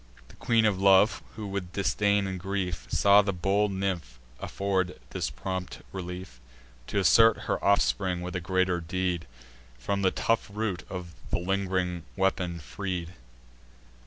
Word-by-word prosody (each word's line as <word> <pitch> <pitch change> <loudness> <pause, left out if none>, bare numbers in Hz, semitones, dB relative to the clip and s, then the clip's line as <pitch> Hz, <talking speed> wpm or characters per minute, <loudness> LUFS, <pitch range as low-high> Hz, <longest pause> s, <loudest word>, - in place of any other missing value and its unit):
The - - -15
Queen 115 -2 +2
of 100 -3 +1
Love, 100 +2 +5
who, 110 -2 -6
with 95 -3 -4
disdain 100 +1 +2
and 95 -1 -4
grief, 95 -2 -3
Saw 100 +1 +6
the 100 -1 -1
bold 100 +3 +1
nymph 95 -11 -3 0.2
afford 95 -2 -1
this - - -2
prompt 95 -1 -5
relief, 90 -7 -7 0.5
T' - - -3
assert 115 +3 +5
her - - -2
offspring 65 +9 +2
with 90 +1 -5
a 90 - -1
greater 95 0 +1
deed, 90 -3 -2 0.5
From 100 +11 -2
the 95 - +4
tough 115 +3 0
root 100 -5 -3
the 90 -2 -5 0.3
ling'ring 90 -1 0
weapon 95 -3 0
freed. 90 +4 -5
95 Hz, 140 wpm, -28 LUFS, 90-100 Hz, 0.5 s, Saw